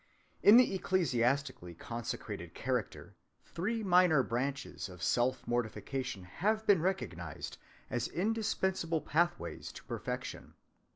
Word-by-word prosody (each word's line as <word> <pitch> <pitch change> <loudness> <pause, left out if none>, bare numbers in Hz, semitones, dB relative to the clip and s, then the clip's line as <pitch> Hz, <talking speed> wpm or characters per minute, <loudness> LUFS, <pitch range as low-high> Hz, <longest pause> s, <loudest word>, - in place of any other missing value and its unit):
In 210 +3 +9
the 250 -5 +5
ecclesiastically 140 - 0
consecrated 115 +6 -5
character - - -3 0.3
three 220 +6 -2
minor 180 -6 +5
branches 130 -2 -3
of 90 -1 -11
self‐mortification 120 -1 -1
have 215 - 0
been 200 -6 +5
recognized 90 - -3 0.3
as 120 -1 -1
indispensable 190 -5 0
pathways 175 +3 -1
to - - -10
perfection. - - -5
145 Hz, 100 wpm, -33 LUFS, 120-190 Hz, 0.3 s, In